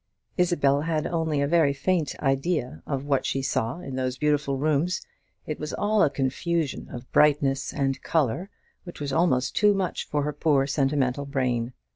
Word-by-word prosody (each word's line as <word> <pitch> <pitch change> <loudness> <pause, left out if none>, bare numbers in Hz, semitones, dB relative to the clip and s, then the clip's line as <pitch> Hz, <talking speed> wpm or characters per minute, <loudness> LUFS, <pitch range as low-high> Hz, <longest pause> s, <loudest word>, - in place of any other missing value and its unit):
Isabel 145 -6 +2
had 155 -1 -1
only 160 -4 0
a 140 - +1
very 160 -3 +3
faint 160 +2 -1
idea 135 - 0
of 135 0 -2
what 140 -2 +1
she 135 - -1
saw 115 0 -1
in 135 -4 -6
those 130 -1 -2
beautiful 145 -1 +1
rooms. 155 +5 +1 0.5
It 155 - -4
was 150 0 -5
all 210 0 +1
a 150 - +5
confusion 140 +3 -2
of 120 +1 -9
brightness 140 -2 +3
and 135 -2 -1
colour, 160 - 0 0.3
which 175 - -10
was 145 -2 -3
almost 135 -6 +2
too 205 -1 +4
much 190 -2 -2
for 145 -1 -1
her 150 +1 -2
poor 145 -2 +2
sentimental 140 -1 0
brain. 125 -3 -1
145 Hz, 170 wpm, -26 LUFS, 135-160 Hz, 0.5 s, a